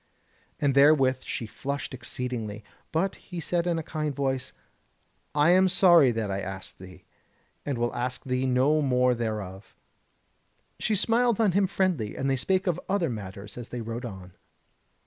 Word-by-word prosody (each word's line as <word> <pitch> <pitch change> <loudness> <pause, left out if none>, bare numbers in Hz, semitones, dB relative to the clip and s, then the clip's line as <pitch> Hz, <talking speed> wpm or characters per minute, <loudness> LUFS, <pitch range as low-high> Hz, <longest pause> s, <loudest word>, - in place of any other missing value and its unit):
And 140 -2 +2
therewith 135 -2 +5
she 115 - -4
flushed 140 +5 -5
exceedingly. 120 -4 -4 0.3
But 180 +5 0
he 180 -3 -8
said 170 +2 -1
in 170 -1 +1
a 165 - -3
kind 150 -2 -3
voice: 135 -2 -1 0.8
"I 150 +3 +5
am 185 +1 +5
sorry 175 -6 +6
that 110 -4 -2
I 95 +1 -2
asked 95 0 -7
thee, 90 0 -12 0.6
and 140 -3 -1
will 120 0 -1
ask 125 +1 -3
thee 130 -1 -1
no 135 +5 +3
more 125 -2 +3
thereof." 105 -4 -5 1.0
She 215 - +1
smiled 230 +2 +2
on 215 -4 +4
him 195 +2 +2
friendly, 180 - 0
and 135 - -1
they 135 - +2
spake 185 - 0
of 180 -2 0
other 190 -7 +1
matters 100 0 -7
as 120 - -8
they 120 - -5
rode 115 +2 -5
on. 95 -5 -9
130 Hz, 165 wpm, -27 LUFS, 115-170 Hz, 1.0 s, sorry